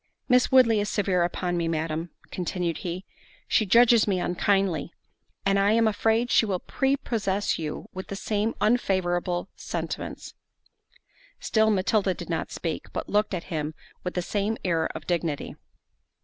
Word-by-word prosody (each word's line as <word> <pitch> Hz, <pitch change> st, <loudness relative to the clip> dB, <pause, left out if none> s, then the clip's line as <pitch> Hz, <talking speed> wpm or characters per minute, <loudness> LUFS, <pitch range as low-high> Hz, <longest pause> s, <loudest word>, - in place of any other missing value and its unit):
"Miss 250 Hz, -1 st, +4 dB
Woodley 240 Hz, -5 st, +6 dB
is 205 Hz, -, -1 dB
severe 195 Hz, -4 st, +1 dB
upon 175 Hz, 0 st, -1 dB
me, 170 Hz, -1 st, 0 dB
Madam," 160 Hz, +1 st, -2 dB, 0.2 s
continued 175 Hz, -2 st, -2 dB
he, 180 Hz, +2 st, -5 dB, 0.4 s
"she 215 Hz, -, +2 dB
judges 235 Hz, +2 st, +6 dB
me 190 Hz, -3 st, +1 dB
unkindly; 180 Hz, -1 st, +1 dB, 0.5 s
and 195 Hz, 0 st, +3 dB
I 200 Hz, +2 st, +4 dB
am 225 Hz, 0 st, +4 dB
afraid 225 Hz, +3 st, +1 dB
she -, -, +5 dB
will 200 Hz, -4 st, 0 dB
prepossess 215 Hz, -6 st, -1 dB
you 155 Hz, -2 st, -4 dB
with 190 Hz, 0 st, -6 dB
the 200 Hz, -, -5 dB
same 210 Hz, +2 st, -1 dB
unfavourable 185 Hz, -5 st, +1 dB
sentiments." -, -, -5 dB, 1.1 s
Still 220 Hz, -1 st, +2 dB
Matilda 195 Hz, -1 st, +2 dB
did -, -, -7 dB
not 165 Hz, -, -2 dB
speak, 165 Hz, -3 st, -4 dB
but -, -, -4 dB
looked 210 Hz, -1 st, +1 dB
at 170 Hz, -, -4 dB
him 155 Hz, 0 st, -2 dB, 0.3 s
with 180 Hz, -, -4 dB
the 180 Hz, -, 0 dB
same 210 Hz, +4 st, -1 dB
air 165 Hz, -3 st, +1 dB
of -, -, -7 dB
dignity. 170 Hz, -4 st, -2 dB
195 Hz, 150 wpm, -26 LUFS, 175-215 Hz, 1.1 s, Woodley